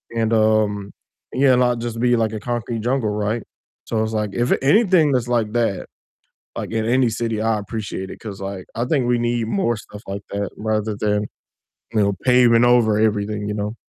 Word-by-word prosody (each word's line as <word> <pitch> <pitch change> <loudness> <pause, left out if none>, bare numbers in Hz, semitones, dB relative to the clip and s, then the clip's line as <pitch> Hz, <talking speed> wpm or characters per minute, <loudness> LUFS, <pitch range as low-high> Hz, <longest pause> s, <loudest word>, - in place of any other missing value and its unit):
and, 115 0 0
um, 110 -2 +2 0.4
yeah, 130 -1 +4
not 125 -1 +2
just 115 -1 -4
be, 120 0 +3
like, 110 -1 0
a 110 - -4
concrete 120 -1 -3
jungle, 125 -2 0
right, 105 +2 -1 0.4
so, 110 -1 0
it's, 110 - -3
like, 105 -2 -1
if 120 +1 0
anything 175 - +4
that's 125 -2 0
like 115 -3 0
that, 115 -5 0 0.7
like, - - -4
in 110 -1 0
any 125 0 +3
city, 110 -1 -2
I 110 -1 +1
appreciate 100 -3 -5
it, - - -10
'cause, 100 -3 -8
like, 95 -1 -6
I 120 - -1
think 130 -4 +1
we 120 -1 +2
need 120 -1 -1
more 120 - 0
stuff 105 0 -11
like 100 +1 -5
that 100 -1 -3
rather 110 0 -1
than, 105 0 0 0.7
you 110 - +2
know, 100 0 +2
paving 125 -2 +5
over 120 -3 +4
everything, 105 -1 0
you 105 - -2
know? 105 +2 -3
110 Hz, 195 wpm, -21 LUFS, 105-120 Hz, 0.7 s, paving